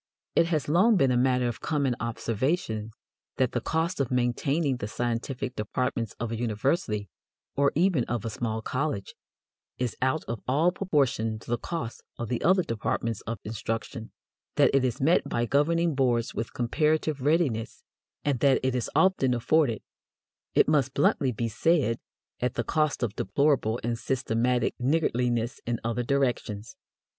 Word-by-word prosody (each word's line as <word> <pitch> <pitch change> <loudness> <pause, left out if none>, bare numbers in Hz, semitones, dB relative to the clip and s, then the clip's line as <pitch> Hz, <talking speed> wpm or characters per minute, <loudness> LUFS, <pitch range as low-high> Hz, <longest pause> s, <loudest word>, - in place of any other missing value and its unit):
It 165 - +4
has 155 -4 0
long 190 +8 +4
been 135 -6 +3
a - - +2
matter 125 0 +2
of 120 - -4
common 140 -5 0
observation 115 - -1 0.5
that 130 -2 +2
the 120 - -1
cost 165 +6 -1
of 135 -3 0
maintaining 130 +3 +1
the 105 - -4
scientific 120 +3 -3
departments 115 +1 -2
of 115 -1 -3
a - - -1
university, 110 - -1 0.5
or 140 0 +3
even 165 -6 +3
of 120 -2 -3
a 115 - -2
small 110 0 -3
college, 130 -7 -2 0.6
is 125 -2 -2
out 130 +5 +1
of 115 - -5
all 150 +7 +3
proportion 135 - 0
to 115 - -10
the 120 - +2
cost 160 -9 -5 0.2
of 120 -2 -4
the 120 - -1
other 185 +2 +4
departments 115 -3 -2
of 115 +1 -2
instruction, 115 +2 -4 0.4
that - - +4
it 135 -1 +4
is 125 -3 -1
met 155 +6 +3
by 120 - 0
governing 165 +6 +2
boards 125 -4 +1
with 115 +2 -4
comparative 150 +4 0
readiness, 140 -6 0 0.4
and 140 -4 +1
that 135 0 +4
it 130 -1 +1
is 125 -2 -1
often 160 -10 +3
afforded, 125 -1 +2 0.7
it - - +5
must 140 -4 +2
bluntly 140 -2 +2
be 115 0 -2
said, 115 +1 +1 0.4
at 125 -1 -1
the 120 - 0
cost 155 0 0
of 105 -4 -2
deplorable 120 0 +1
and 115 0 -1
systematic 125 -1 0
niggardliness 125 -4 0
in 120 -1 -1
other 115 +1 -1
directions. 120 -3 -1
125 Hz, 160 wpm, -27 LUFS, 115-145 Hz, 0.7 s, it